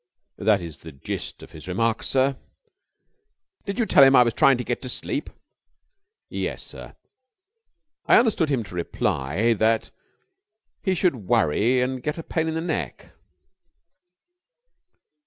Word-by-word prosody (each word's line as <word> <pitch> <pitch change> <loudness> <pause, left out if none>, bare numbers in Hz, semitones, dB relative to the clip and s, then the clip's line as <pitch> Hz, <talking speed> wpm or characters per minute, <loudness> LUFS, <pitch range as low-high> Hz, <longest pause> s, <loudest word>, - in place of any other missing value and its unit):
"That 105 -2 +2
is 80 -3 -8
the 80 - -11
gist 70 -2 -6
of - - -13
his 80 +2 -12
remarks, 115 +5 0
sir." 135 +1 +2 1.3
"Did 200 0 -4
you 235 - +1
tell 140 - +6
him 135 0 +7
I 125 - +8
was 120 -1 -1
trying 135 -2 +4
to 125 - -3
get 120 - -3
to 130 - -6
sleep?" - - -4 1.0
"Yes, - - -4
sir. - - -10 1.1
I - - +7
understood 215 -10 +2
him 130 -5 0
to 95 - -13
reply 85 - 0
that 110 +1 +1 0.9
he 190 -1 0
should 135 - 0
worry 115 +14 +2
and 130 0 -2
get 150 +4 -3
a 165 - -6
pain 160 0 -2
in 160 - -2
the 160 - -1
neck." 155 - -4
125 Hz, 145 wpm, -24 LUFS, 100-150 Hz, 1.3 s, I